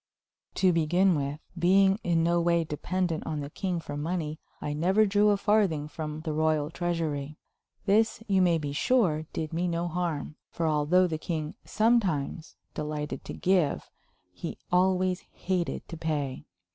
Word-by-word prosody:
To 185 -2 +3
begin 175 +4 +3
with, 145 -1 -2 0.2
being 195 +3 +4
in 165 -2 +2
no 170 +1 +2
way 170 0 +2
dependent 165 +2 -2
on 155 -2 -2
the 140 +1 -6
king 180 0 -2
for 155 -3 -7
money, 155 0 -3 0.2
I 150 - -3
never 190 +8 +3
drew 205 +1 +3
a 205 - +3
farthing 195 -8 +2
from 155 0 -5
the 155 -1 -3
royal 155 -1 +1
treasury. 160 -4 -2 0.5
This, 220 +2 +2
you 195 -2 +3
may 175 -2 +4
be 145 -3 -4
sure, 160 - +2
did 160 0 -4
me 175 +2 0
no 170 0 -1
harm, 165 -3 -3
for 165 - -3
although 155 +4 +3
the 160 -3 -2
king 155 -2 -3
sometimes 190 -9 +1 0.2
delighted 150 -1 -4
to - - -6
give, 180 -5 +1 0.4
he 125 - -6
always 185 0 +2
hated 180 -2 -2
to 165 - -6
pay. 150 -5 -2
165 Hz, 160 wpm, -28 LUFS, 150-185 Hz, 0.5 s, being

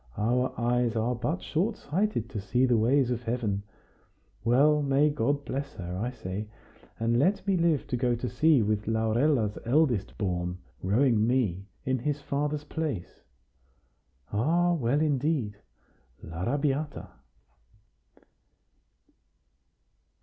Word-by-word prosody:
Our 125 +4 +1
eyes 120 0 +1
are 115 +2 +1
but 125 +9 -2
short 195 +8 -1
sighted 180 - -1
to 105 - -4
see 120 +7 +2
the 125 -2 +3
ways 125 +3 +3
of 120 -1 -2
Heaven! 115 -4 -1 0.8
Well, 145 +6 +4
may 140 +1 +3
God 145 +1 0
bless 140 +1 -4
her, 90 -1 -5
I 110 +6 -2
say, 105 -4 -5 0.5
and 115 +1 +2
let 190 +8 +2
me 195 -1 +2
live 170 -5 +2
to - - -2
go 120 0 +1
to 120 +2 -4
sea 155 -3 +3
with 105 0 -1
Laurella's 110 +1 +1
eldest 125 -4 +1
born, 90 -3 -2 0.2
rowing 110 +2 +3
me 105 -7 0 0.2
in 130 0 0
his 145 +4 -1
father's 145 +1 -2
place! 150 - -4 1.1
Ah! 170 +11 +2
well, 145 -2 +1
indeed! 140 -7 0 0.7
l'Arrabiata!" 140 - -2
125 Hz, 120 wpm, -28 LUFS, 110-145 Hz, 1.1 s, Well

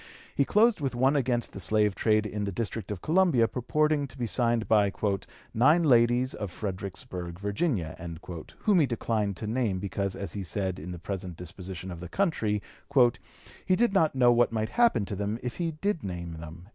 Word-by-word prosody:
He 140 - +2
closed 215 - +3
with 135 -3 -1
one 130 +4 +3
against 125 -4 0
the - - -7
slave 105 +2 +2
trade 110 +1 +2
in 105 -1 -3
the 100 - -2
District 110 +1 -4
of 105 -3 -5
Columbia 160 -9 +4
purporting 150 +4 0
to - - -15
be 120 - -1
signed 115 0 +1
by 105 -2 +4 0.6
"nine 150 +9 +5
ladies 120 -2 +4
of 105 -2 -5
Fredericksburg, 95 -2 -6
Virginia," 100 - -1 0.7
whom 205 -4 +4
he 150 - +4
declined 110 -5 -1
to - - -5
name 110 -3 0
because, 100 0 -2
as 100 -4 -5
he 100 - -4
said, 95 +1 -2
in 85 +4 -7
the 90 - -6
present 90 -1 -5
disposition 90 +1 -7
of 85 - -7
the 90 0 -8
country, 110 - 0 1.0
"he 185 - +2
did 235 0 +2
not 160 -7 +3
know 125 -2 +5
what 120 -1 +3
might 110 -1 -1
happen 235 - +3
to 100 - -4
them 100 +3 -2
if 125 -1 -4
he 170 -2 -1
did 165 +2 -2
name 85 -3 -5
them." 85 +2 -10
110 Hz, 190 wpm, -28 LUFS, 95-135 Hz, 1.0 s, nine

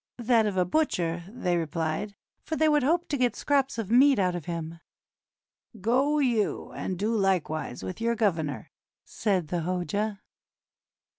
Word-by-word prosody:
"That 235 -2 +3
of 200 -2 -2
a 180 - +3
butcher," 175 - 0
they 180 -6 -1
replied, 165 +5 -2 0.3
"for 320 - -4
they 315 0 +3
would 300 -1 +4
hope 335 +6 +1
to 285 - 0
get 245 -3 +1
scraps 275 -4 +1
of 220 -2 -4
meat 270 +3 +6
out 185 -3 +2
of 170 -4 -5
him." 165 -1 -5 0.5
" 225 - -23
Go 260 +9 +2
you 240 -7 0
and 185 - -4
do 215 +5 0
like 195 -5 +1
wise 155 -5 -5
with 185 +4 -6
your 235 0 +1
governor," 165 -10 -1 0.3
said 185 -7 -1
the 175 -1 -1
Hoja. 200 +4 -2
205 Hz, 165 wpm, -27 LUFS, 175-250 Hz, 0.5 s, meat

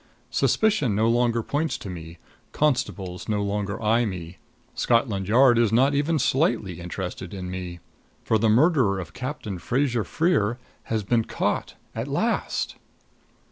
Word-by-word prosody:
Suspicion 210 - +2
no 110 +2 +2
longer 120 0 +2
points 155 +6 -1
to - - -9
me; 85 -2 -8 0.4
constables 115 -11 -1
no 105 -1 +1
longer 100 0 -2
eye 115 +3 +3
me; 90 -5 -5 0.4
Scotland 115 -5 +1
Yard 120 +2 +5
is 115 -3 +3
not 130 +5 +4
even 145 +3 +1
slightly 125 - +1
interested 90 +1 -6
in 90 -1 -5
me. 90 -1 -6 0.4
For 110 - +2
the 110 +1 +3
murderer 125 - +4
of 80 -4 -7
Captain 125 - -5
Fraser 120 +3 0
Freer 120 - +1 0.3
has 110 -2 -1
been 115 +2 +1
caught - - -2 0.2
at - - -4
last! - - -1
110 Hz, 140 wpm, -25 LUFS, 95-130 Hz, 0.4 s, Yard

